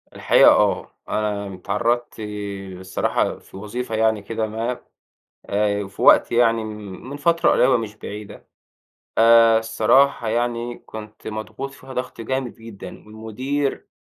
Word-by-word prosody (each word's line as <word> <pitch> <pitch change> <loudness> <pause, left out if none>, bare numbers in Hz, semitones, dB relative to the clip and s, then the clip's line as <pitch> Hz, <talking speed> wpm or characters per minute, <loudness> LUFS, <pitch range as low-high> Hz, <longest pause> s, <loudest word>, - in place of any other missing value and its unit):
الحقيقة، - - +6
آه، - - +1 0.2
أنا 100 -2 -2
اتعرَّضت 120 +6 -1 0.6
الصراحة 95 0 -1
في - - -14
وظيفة 110 +3 -4
يعني 110 -1 +2
كده 110 +2 -3
ما، 115 +3 -3 0.7
آآ 105 0 0
في 100 - -9
وقت - - +6
يعني، 115 -1 +3
من 105 +5 -8
فترة 170 +3 +2
قريبة 125 0 +4
مش 110 -2 -5
بعيدة. 105 -1 -9 0.7
آآ، 115 0 +6
الصراحة 135 +5 +2
يعني 120 +1 -1
كنت 110 -1 -10
مضغوط 110 +5 -5
فيها 130 -1 -12
ضغط 125 -2 -5
جامد 130 +2 -3
جدًا، 115 -3 -10 0.2
والمدير، 125 +6 -3
115 Hz, 125 wpm, -22 LUFS, 105-120 Hz, 0.7 s, الحقيقة